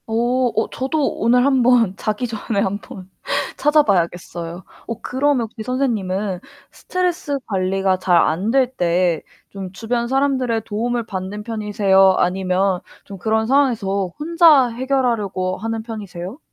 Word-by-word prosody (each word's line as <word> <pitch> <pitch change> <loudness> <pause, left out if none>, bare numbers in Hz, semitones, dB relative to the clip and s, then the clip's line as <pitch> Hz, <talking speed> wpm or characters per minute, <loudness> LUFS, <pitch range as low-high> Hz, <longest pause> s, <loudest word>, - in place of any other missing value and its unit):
어. 225 - -3 0.4
어 220 - 0
저도 275 +3 -1
오늘 245 +3 +3
한번 250 -7 +3
자기 215 +5 -2
전에 220 -2 -3
한번 195 -1 -4 0.5
찾아봐야겠어요. 175 - 0 0.2
어 230 - -5
그러면 270 0 +1
혹시 220 0 -9
선생님은 210 -7 -1 0.3
스트레스 355 -5 -2
관리가 190 -1 0
잘 180 -2 +3
안될 225 +11 +2
때 175 -2 +1 0.3
좀 195 -2 -6
주변 235 +3 -2
사람들의 260 -3 +1
도움을 235 +2 -2
받는 195 0 -5
편이세요? 205 -4 +3
아니면 185 +1 +1 0.2
좀 200 - -10
그런 220 +3 0
상황에서 220 -8 +1
혼자 310 -5 +5
해결하려고 230 -7 -1
하는 225 +1 -4
편이세요? 205 - -7
220 Hz, 295 characters per minute, -20 LUFS, 190-250 Hz, 0.5 s, 혼자